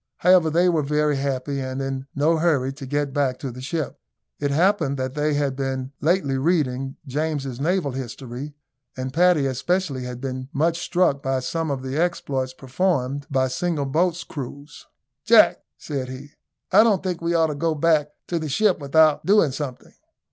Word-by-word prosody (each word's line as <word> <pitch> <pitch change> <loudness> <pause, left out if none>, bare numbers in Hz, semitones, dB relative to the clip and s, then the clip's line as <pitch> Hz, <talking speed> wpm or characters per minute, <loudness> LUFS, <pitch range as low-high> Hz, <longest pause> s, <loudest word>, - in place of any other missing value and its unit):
However, 180 -3 +5
they 170 +3 +3
were 165 -3 +2
very 150 0 +1
happy, 135 0 -2
and 130 0 -4
in 135 0 -4
no 155 +3 +3
hurry 145 -5 +1
to 135 -1 -9
get 145 0 -1
back 135 -3 0
to 135 - -5
the 125 +2 -9
ship. 150 +1 -3 0.4
It 145 - 0
happened 155 -2 +2
that 130 0 -3
they 150 0 0
had 140 -2 0
been 135 -1 -3
lately 150 -5 +1
reading 135 -4 0
James's 140 -2 -3
Naval 165 -1 0
History, 130 +2 -7 0.4
and 130 0 -4
Paddy 175 -3 +4
especially 140 +2 -1
had 125 -1 -6
been 130 0 -5
much 165 +4 +1
struck 175 -7 +1
by 135 -1 0
some 165 +5 -2
of 135 -2 -3
the 130 +2 -3
exploits 140 -6 -1
performed 140 -1 -1
by 130 -2 +1
single 145 +3 -1
boat's 170 +5 0
crews. 140 +1 -9 0.4
"Jack," - - +6 0.2
said 135 -3 -4
he, 135 +3 -9 0.4
"I - - +8
don't 215 -5 +3
think 180 -3 -3
we 170 0 0
ought 165 -1 +4
to - - -8
go 160 +2 0
back 150 -1 +2 0.2
to 170 - -2
the 155 -1 -4
ship 195 +6 +2
without 155 +1 +3
doing 195 -7 +4
something." 135 -2 -6
145 Hz, 175 wpm, -23 LUFS, 135-165 Hz, 0.4 s, I